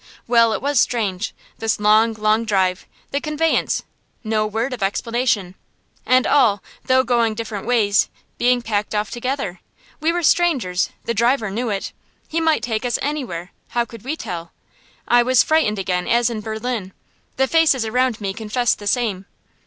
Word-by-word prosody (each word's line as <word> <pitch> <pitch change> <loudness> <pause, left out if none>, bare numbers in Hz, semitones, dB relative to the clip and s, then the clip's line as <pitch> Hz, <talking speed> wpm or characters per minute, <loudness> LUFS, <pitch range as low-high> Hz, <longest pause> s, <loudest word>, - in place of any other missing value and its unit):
Well, 230 -1 +4
it - - -4
was 285 0 +2
strange 210 -4 0 0.3
this 225 -2 0
long, 215 +2 +4
long 215 +1 +1
drive, 190 -4 0 0.2
the 280 - -1
conveyance, 305 +1 0 0.4
no 215 -1 0
word 225 +5 -2
of 245 - -6
explanation; 210 -1 0 0.5
and 255 +2 +4
all, 225 -8 +3 0.2
though 260 0 +4
going 235 -3 +1
different 215 -2 -5
ways, 215 -4 +3 0.3
being 245 0 +2
packed 210 -1 -2
off 210 0 -1
together. 245 -7 -3 0.4
We 320 +2 +2
were 350 0 -2
strangers; 265 - +2 0.2
the 235 - 0
driver 235 -1 +1
knew 235 +4 -2
it. 200 -2 -3 0.3
He 330 +1 -1
might 320 -1 +2
take 220 -2 -2
us 245 -1 0
anywhere 245 - -4 0.2
how 240 -1 0
could 230 -2 -12
we 280 +5 -2
tell? 175 - -6 0.5
I 240 0 +5
was 255 +1 +4
frightened 310 -10 +2
again 180 -2 -1
as 240 +1 +2
in 220 -2 -4
Berlin. 220 -2 -4 0.4
The 265 0 +3
faces 305 -6 +3
around 250 0 +1
me 195 -2 -3
confessed 225 +3 0
the 205 - -7
same. 205 -5 0
230 Hz, 165 wpm, -21 LUFS, 210-255 Hz, 0.5 s, I